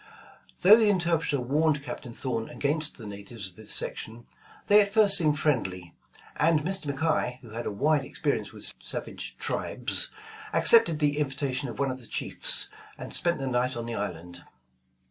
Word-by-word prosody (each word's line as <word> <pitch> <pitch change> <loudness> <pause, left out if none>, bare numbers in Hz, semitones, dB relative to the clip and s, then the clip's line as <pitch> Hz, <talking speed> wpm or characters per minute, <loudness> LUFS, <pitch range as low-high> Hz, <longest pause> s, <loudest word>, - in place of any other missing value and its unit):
Though 200 +4 +9
the 220 -2 +3
interpreter 170 -6 +1
warned 145 +3 0
Captain 125 -2 -7
Thorn 115 -2 -4
against 150 +2 -1
the 115 - -10
natives 100 +1 -8
of 90 - -17
this 110 +1 -8
section, 115 +2 -3 0.4
they 205 +1 +6
at 200 -1 -1
first 210 -2 +6
seemed 155 -5 +3
friendly, 95 - -1 0.4
and 160 0 +3
Mr. 180 -4 -3
McKay, 140 -4 -1
who 120 -4 -14
had 115 +2 -5
a - - -2
wide 145 +7 +1
experience - - -3
with - - -1
savage - - -7
tribes, - - +1 0.4
accepted 225 -9 +5
the 150 -1 0
invitation 135 -2 -2
of 115 - -8
one 140 -1 0
of 130 - -7
the 120 - -11
chiefs, - - 0 0.3
and - - -8
spent 170 0 +5
the 135 - -4
night 125 0 -1
on 115 - -4
the 120 - -5
island. 90 -4 -6
140 Hz, 170 wpm, -27 LUFS, 115-160 Hz, 0.4 s, Though